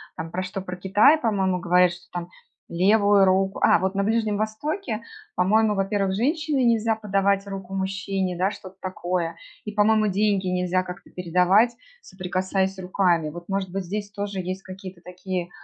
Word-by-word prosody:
там 165 0 -6
про 185 +2 -2
что, 190 +1 -5
про 180 -1 -6
Китай, 205 - +5
по-моему, 190 -7 0
говорят, 180 +1 +3
что 175 +1 -14
там 175 0 -5 0.4
левую 200 +2 +4
руку, 190 +1 +1
а - - +6
вот 190 +2 -1
на 200 0 0
Ближнем 220 -1 +1
Востоке, 220 - -3 0.3
по-моему, 210 +3 +3
во-первых, 195 0 0
женщине 295 - 0
нельзя 230 -2 +2
подавать 200 -2 +1
руку 195 -1 -7
мужчине, 190 -1 -2
да, 190 +3 +1
что-то 190 -2 -11
такое, 175 -2 -2 0.3
и, 210 - -4
по-моему, 215 +1 +3
деньги 200 -1 +1
нельзя 180 0 +1
как-то 180 0 -9
передавать, 180 +6 +3 0.3
соприкасаясь 190 - -2
руками. 180 -4 +1
Вот, 170 +3 -10
может 195 -1 -1
быть, 195 +1 -3
здесь 205 +3 -4
тоже 205 -1 -4
есть 185 +1 -4
какие-то 185 -1 -10
такие 180 0 -5
195 Hz, 160 wpm, -24 LUFS, 180-210 Hz, 0.4 s, а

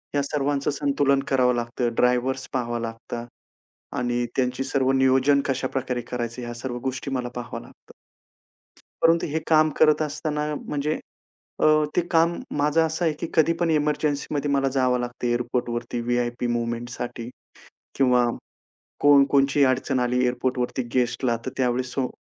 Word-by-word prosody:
या 145 - +3
सर्वांचं 140 0 -1
संतुलन 140 -1 +1
करावं 125 -2 +3
लागतं, 120 0 -2
ड्रायव्हर्स 125 +2 +1
पहावं 120 -2 -2
लागतात 115 +1 -6 0.7
आणि 120 -1 0
त्यांची 125 0 0
सर्व 135 -1 +1
नियोजन 135 +1 +4
कशाप्रकारे 130 -1 -2
करायचं 120 0 -3
ह्या 120 0 -5
सर्व 120 0 -5
गोष्टी 130 +1 -3
मला 125 -2 -2
पाहाव्या 120 -2 -5
लागतात. - - -19 1.1
परंतु 165 0 +4
हे 155 +1 -1
काम 155 -1 +5
करत 155 0 +5
असताना 150 0 -2
म्हणजे 150 +1 -2 0.6
अ, - - +5 0.3
ते - - +4
काम 165 +1 +4 0.2
माझं 150 +3 +3
असं 160 +2 -2
आहे 160 - +2
की - - -3
कधी 160 0 +4
पण 170 - +1
एमर्जन्सीमध्ये 150 -1 0
मला 135 -1 +2
जावं 130 -2 +1
लागतं 120 0 -4
एअरपोर्टवरती, 120 0 -2
व्हि-आय-पी 120 0 -1
मूव्हमेंटसाठी 120 0 -4 0.7
किंवा 125 -2 +4 0.8
कोण 145 -1 +7
कोणतीही 140 0 +4
अडचण 130 0 +1
आली 125 0 +1
एअरपोर्टवरती 125 +1 -1
गेस्टला 125 -1 +1
तर - - -1
त्यावेळेस 125 0 0
सो 130 -2 0
130 Hz, 140 wpm, -24 LUFS, 120-145 Hz, 1.1 s, कोण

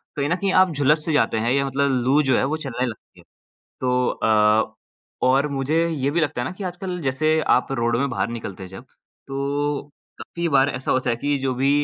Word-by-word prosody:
कहीं 145 +1 -1
न 180 - +2
कहीं 195 +1 -1
आप 185 - -3
झुलस 150 +1 +2
से 160 - -1
जाते 145 - +2
हैं 115 +2 0
या 140 +1 +2
मतलब 140 +1 0
लू 140 +4 +4
जो 130 -2 +2
है - - +1
वो - - 0
चलने 130 -5 -3
लगती 110 - -10
है। - - -17 0.6
तो 125 0 +1
अ, 110 0 +2 0.5
और 135 +3 +3
मुझे 150 +4 0
ये 140 -4 -1
भी 170 - 0
लगता 145 -5 -1
है 120 - -2
ना - - -5
कि 205 - -6
आजकल 180 0 -5
जैसे 155 +4 +1 0.2
आप - - -1
रोड 120 -3 0
में 140 +2 0
बाहर 100 -5 -1
निकलते 100 -5 -7
हैं 95 - -9
जब 95 +7 -11 0.4
तो 140 +1 -2 0.4
काफ़ी 170 0 -4
बार 135 +1 +4
ऐसा 130 -1 -3
होता 130 -1 +1
है 115 - +1
कि 145 +4 -1
जो 130 -1 -1
भी 135 +2 +1
135 Hz, 230 wpm, -22 LUFS, 125-150 Hz, 0.6 s, लू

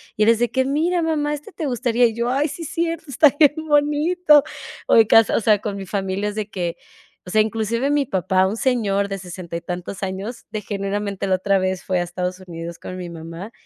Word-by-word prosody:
y 215 - +2
es 230 - +5
de 240 0 +1
que: 260 0 +1
"Mira 325 +6 +1
mamá, 300 -2 0
este 295 +8 -7
te 325 - -5
gustaría.", 245 -2 +2
y 230 - +1
yo: 235 +1 -1
"Ay 275 +4 +1
sí 330 +3 -7
cierto, 330 +1 -2
está 280 +3 +5
bien 295 -2 +6
bonito". 295 +1 +4 0.4
O - - +4
de 225 -2 +6
casa, 225 -1 +5
o - - +3
sea, 210 -1 +4
con 205 -1 -4
mi 195 - -6
familia 195 0 -2
es 205 - -7
de 215 -1 -3
que, 175 -3 -3 0.5
o - - -6
sea, 215 +3 +4
inclusive 225 +4 -1
mi 290 -1 +2
papá, 190 -2 +1
un 205 +4 -3
señor 210 -6 +1
de 195 0 -4
sesenta 180 -2 -8
y 170 - -3
tantos 180 +2 -6
años, 195 +5 -5
de 215 - -3
generalmente 200 0 -3
la 190 - +3
otra 195 +1 +1
vez 185 -1 -2
fue 185 -1 0
a - - +1
Estados 180 +1 -4
Unidos 170 -2 -8
con 185 - -7
mi 180 -1 -6
mamá 165 +5 -8
210 Hz, 230 wpm, -21 LUFS, 185-270 Hz, 0.5 s, bien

